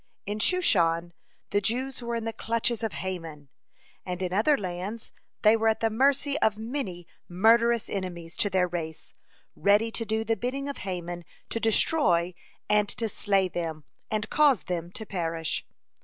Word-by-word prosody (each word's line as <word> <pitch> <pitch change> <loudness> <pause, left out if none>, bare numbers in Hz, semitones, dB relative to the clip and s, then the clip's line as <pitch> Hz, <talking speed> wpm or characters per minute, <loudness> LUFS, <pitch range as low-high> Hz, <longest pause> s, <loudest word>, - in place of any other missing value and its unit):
In 210 +2 -3
Shushan 175 - +2 0.4
the 205 - +2
Jews 250 +5 -1
were 235 0 -3
in 230 -1 -3
the 225 - -2
clutches 230 +1 -1
of 225 -2 -1
Haman, 165 -6 -5 0.5
and 180 0 -4
in 180 0 -2
other 250 +9 +4
lands 190 +3 -5 0.3
they 215 +1 +7
were 225 0 +1
at 220 - +3
the 225 -1 +1
mercy 275 +4 +2
of 215 -6 +2
many 220 -7 -4 0.2
murderous 230 +5 +4
enemies 175 -4 -5
to 205 - +2
their 185 -1 +2
race, 165 -2 -5 0.4
ready 210 +3 +3
to 230 - -1
do 220 0 -1
the 225 0 +1
bidding 260 +6 -3
of 280 - -4
Haman 175 -2 -4 0.3
to 230 - -1
destroy 195 - +3 0.3
and 210 -1 +3
to 230 - -2
slay 195 -3 +1
them, 165 -3 -4 0.3
and 215 0 -1
cause 290 -7 +4
them 175 -1 -3
to 220 - -6
perish. 165 -4 -2
210 Hz, 165 wpm, -27 LUFS, 175-230 Hz, 0.5 s, they